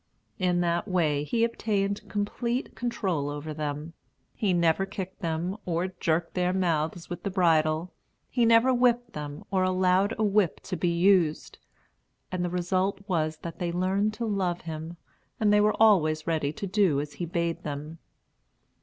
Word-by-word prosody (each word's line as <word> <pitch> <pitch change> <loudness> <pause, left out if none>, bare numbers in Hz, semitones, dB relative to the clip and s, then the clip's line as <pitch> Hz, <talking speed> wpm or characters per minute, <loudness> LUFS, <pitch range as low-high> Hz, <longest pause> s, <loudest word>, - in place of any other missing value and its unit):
In 180 -1 +2
that 170 +2 0
way, 155 -6 +1
he 225 +9 0
obtained 205 -3 -1
complete 235 +5 -2
control 190 - -1
over 145 +1 -5
them. 150 +1 -4 0.4
He 205 -4 0
never 170 +1 +3
kicked 190 -2 -6
them, 170 +2 -2
or 175 +1 -1
jerked 165 +1 0
their 180 0 +1
mouths 165 -2 -1
with 175 - -6
the 200 - -2
bridle; 165 -2 +2 0.3
he 245 - +1
never 230 +3 +5
whipped 245 -1 +2
them, 145 -1 -6
or 190 -1 +2
allowed 185 +3 +2
a 220 - 0
whip 205 -4 +2
to 185 - -4
be 175 +1 0
used; 170 -2 +2 0.7
and 185 -1 -1
the 175 - -1
result 185 +3 0
was 155 -4 0
that 170 -1 -7
they 175 -1 -1
learned 190 +4 0
to 235 - -3
love 190 -5 -1
him, 160 +1 -6 0.4
and 210 -1 +3
were 210 0 +4
always 155 -8 +4
ready 155 -4 0
to 200 +6 -6
do 190 -7 +2
as 145 0 -5
he 175 - -4
bade 170 0 -1
them. 150 +2 -6
180 Hz, 165 wpm, -27 LUFS, 160-200 Hz, 0.7 s, never